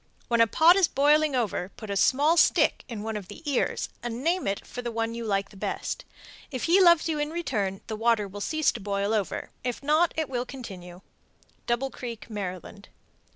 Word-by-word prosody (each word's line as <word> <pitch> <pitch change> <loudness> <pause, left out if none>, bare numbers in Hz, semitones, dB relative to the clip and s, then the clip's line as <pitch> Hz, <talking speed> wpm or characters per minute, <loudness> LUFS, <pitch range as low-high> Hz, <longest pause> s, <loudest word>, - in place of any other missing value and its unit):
When 235 -1 +3
a 230 - +6
pot 325 - +6
is 385 -3 +4
boiling 295 +1 +3
over, 205 -6 -1
put 215 -3 -7
a - - -1
small 285 - +4
stick 345 - +3
in 225 -5 -6
one 220 0 -3
of 205 -3 -5
the 210 - -11
ears 280 -3 0
and 240 +1 -5
name 345 +3 +1
it 195 0 -2
for 245 - -7
the 240 - -3
one 225 0 -2
you 235 0 -5
like 200 -2 -2
best. - - -3 0.4
If 255 -4 -5
he 360 +4 +5
loves 340 -3 +6
you 310 -2 -1
in 295 0 -1
return, 205 - -2
the 220 - -4
water 225 -2 +2
will 205 +1 -8
cease 310 +7 +1
to - - -7
boil 200 +1 -1
over; 210 -4 -2
if 250 +1 -3
not, 310 +4 +3
it 315 -2 0
will 245 -2 -2
continue. 190 -9 -9 0.7
_Double 245 +3 0
Creek, 235 -3 -7
Md. 195 0 -6
235 Hz, 200 wpm, -27 LUFS, 205-295 Hz, 0.7 s, a